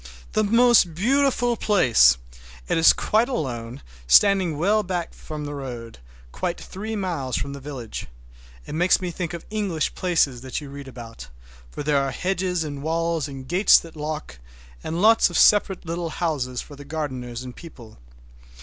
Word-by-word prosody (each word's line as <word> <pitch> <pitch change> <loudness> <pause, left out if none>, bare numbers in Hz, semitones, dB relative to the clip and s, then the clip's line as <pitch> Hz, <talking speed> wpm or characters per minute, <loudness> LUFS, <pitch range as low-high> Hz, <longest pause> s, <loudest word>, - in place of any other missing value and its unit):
The 215 - +1
most 230 -5 +4
beautiful 245 - +2
place! 120 - +4 0.5
It - - +1
is 165 - +8
quite 225 +4 +1
alone, 125 - -4 0.2
standing 185 - +5
well 205 +7 +2
back 180 -4 -4
from 150 -1 -7
the 145 - -5
road, 120 - -7 0.3
quite 175 - -3
three 215 +4 -6
miles 165 - -3
from 140 - -4
the 140 - -7
village. 130 -5 -7 0.6
It - - -8
makes 175 +4 +3
me 180 -2 -4
think 170 0 -4
of 170 - -9
English 195 -8 -1
places 160 -9 +1
that 130 0 -4
you 145 -2 -10
read 140 -1 -9
about, 115 - -10 0.4
for 145 - -6
there 145 -1 +2
are 135 - -1
hedges 180 +4 -1
and 145 -2 -6
walls 165 0 -1
and 135 -2 -9
gates 180 +6 +6
that 165 -1 -7
lock, 150 - -5 0.4
and 170 +4 -2
lots 225 +1 +6
of - - -2
separate 200 -3 +4
little 170 0 -3
houses 140 -7 -2
for 145 - -13
the 145 - -11
gardeners 130 -5 -5
and 125 -1 -9
people. 120 - -13
160 Hz, 170 wpm, -23 LUFS, 135-185 Hz, 0.6 s, is